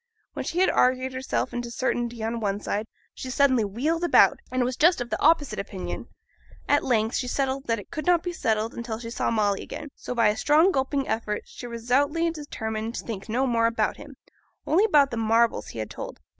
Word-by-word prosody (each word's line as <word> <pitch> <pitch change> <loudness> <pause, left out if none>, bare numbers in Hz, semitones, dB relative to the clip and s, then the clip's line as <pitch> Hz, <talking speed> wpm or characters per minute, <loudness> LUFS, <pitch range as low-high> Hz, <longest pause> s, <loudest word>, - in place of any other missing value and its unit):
When - - -4
she 335 - -4
had 375 - +4
argued 255 +1 +2
herself 260 +1 -2
into 240 -1 -3
certainty 240 -2 -2
on 230 +1 -2
one 205 -2 -1
side, 210 +1 -3 0.3
she 260 - -7
suddenly 260 -3 +3
wheeled 285 - -1
about, 345 - +5
and 255 0 +1
was 250 +1 -1
just 340 +4 +4
of 245 -1 -5
the - - -2
opposite 290 -8 +3
opinion. 195 -2 -5 0.6
At 290 0 +3
length 225 -2 +1
she 250 - -2
settled 270 +1 -1
that 230 -1 +1
it 205 - -10
could 310 -1 -5
not 350 -2 +4
be 355 -1 -3
settled 220 -6 -1
until 235 -2 -5
she 230 0 -7
saw - - -1
Molly 205 -3 +1
again; 295 - -7
so, 250 - -6
by 230 -3 +4
a 210 - 0
strong 310 - +4
gulping 270 -2 -1
effort, 215 -1 -2
she 245 - -9
resolutely 280 +8 +1
determined 225 -7 -5
to - - -5
think 215 -2 -6
no 250 +4 +1
more 230 -2 +2
about 225 -2 0
him, 290 -1 -11 0.5
only 370 +7 +4
about 290 -9 +4
the 235 - -3
marvels 225 +1 +2
he - - -9
had 110 -1 -4
told. - - -7
245 Hz, 210 wpm, -25 LUFS, 225-285 Hz, 0.6 s, about